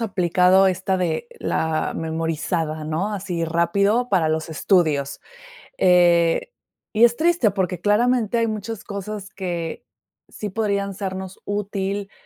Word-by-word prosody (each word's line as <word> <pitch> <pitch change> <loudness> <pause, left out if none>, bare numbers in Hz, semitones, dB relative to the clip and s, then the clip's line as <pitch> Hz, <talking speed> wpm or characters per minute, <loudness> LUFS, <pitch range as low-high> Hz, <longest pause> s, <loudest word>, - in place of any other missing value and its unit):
aplicado 185 -2 +3
esta 190 +1 -1
de 180 - -1
la 160 -1 -1
memorizada, 160 0 -2
¿no?, 165 +7 -2
así 180 -4 -3
rápido 200 +8 +1
para 175 -7 +2
los 160 +1 -1
estudios, 155 -4 +1 0.6
eh, 175 - +4 0.4
y 220 +2 +5
es 240 0 +4
triste 330 -8 +3
porque 185 -3 -2
claramente 230 +3 +2
hay 230 0 +2
muchas 220 0 -5
cosas 200 0 -6
que 175 -5 -5 0.4
sí 210 - -6
podrían 200 -1 -1
sernos 190 -1 -6
útil, 200 -1 -3
190 Hz, 120 wpm, -22 LUFS, 170-205 Hz, 0.6 s, y